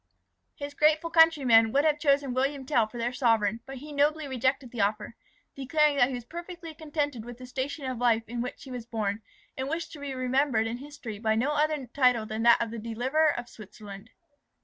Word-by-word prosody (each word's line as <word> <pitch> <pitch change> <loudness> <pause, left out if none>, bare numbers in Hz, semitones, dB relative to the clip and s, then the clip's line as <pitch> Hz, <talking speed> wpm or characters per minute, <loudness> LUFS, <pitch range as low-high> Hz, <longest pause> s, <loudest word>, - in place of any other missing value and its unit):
His 285 0 -7
grateful 310 +3 +2
countrymen 275 -9 +5
would 280 +4 +2
have 300 -1 +2
chosen 280 -3 +2
William 270 +1 -1
Tell 240 -6 +2
for 240 - -10
their 240 +1 -2
sovereign, 225 -4 +2
but 270 0 -7
he 295 +4 -10
nobly 295 +1 +1
rejected 260 0 -1
the 240 - -3
offer, 210 +2 -1 0.4
declaring 295 +2 +2
that 245 -2 +5
he 260 - -3
was 245 -2 -7
perfectly 340 +2 -8
contented 295 -6 -3
with 240 0 -9
the 255 - -10
station 270 +3 -4
of 255 -2 -3
life 230 -2 +2
in 240 +1 -4
which 250 - -6
he 265 - -10
was 245 -2 -7
born, 215 -2 -2 0.3
and 265 +1 -4
wished 325 +2 -3
to 305 - -10
be 280 -2 -5
remembered 255 -2 +1
in 225 +1 -3
history 265 -6 -8
by 220 0 +1
no 255 +6 +1
other 300 -2 0
title 250 -3 +2
than 215 +1 -4
that 235 0 +6
of 230 -1 -2
the 230 - -5
Deliverer 250 +8 +1
of 240 0 -5
Switzerland. 210 -1 -12
255 Hz, 210 wpm, -28 LUFS, 230-290 Hz, 0.4 s, that